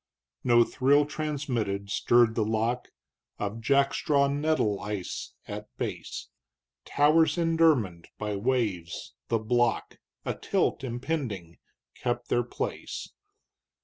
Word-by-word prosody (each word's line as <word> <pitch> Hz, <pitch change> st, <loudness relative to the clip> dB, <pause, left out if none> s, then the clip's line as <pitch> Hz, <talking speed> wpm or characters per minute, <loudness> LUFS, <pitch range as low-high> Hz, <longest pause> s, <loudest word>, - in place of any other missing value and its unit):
No 120 Hz, -1 st, +6 dB
thrill 140 Hz, +5 st, +3 dB
transmitted 130 Hz, -10 st, -2 dB
stirred 120 Hz, -1 st, +4 dB
the 115 Hz, -, +1 dB
lock 115 Hz, +3 st, 0 dB, 0.5 s
Of 105 Hz, +3 st, -3 dB
jack 140 Hz, +3 st, +3 dB
straw 140 Hz, -2 st, +2 dB
neddle 140 Hz, -7 st, +1 dB
ice 100 Hz, -3 st, -5 dB
at -, -, -6 dB
base; -, -, -5 dB, 0.6 s
Towers 155 Hz, +4 st, +4 dB
indermined 160 Hz, -, +2 dB
by 105 Hz, -1 st, -2 dB
waves 100 Hz, -7 st, -1 dB
the 115 Hz, -, +2 dB
block 120 Hz, +1 st, 0 dB, 0.3 s
Atilt -, -, 0 dB
impending 120 Hz, -, -3 dB, 0.3 s
kept 120 Hz, -1 st, -3 dB
their 120 Hz, -, +3 dB
place. 120 Hz, -, -5 dB
120 Hz, 105 wpm, -28 LUFS, 105-140 Hz, 0.6 s, No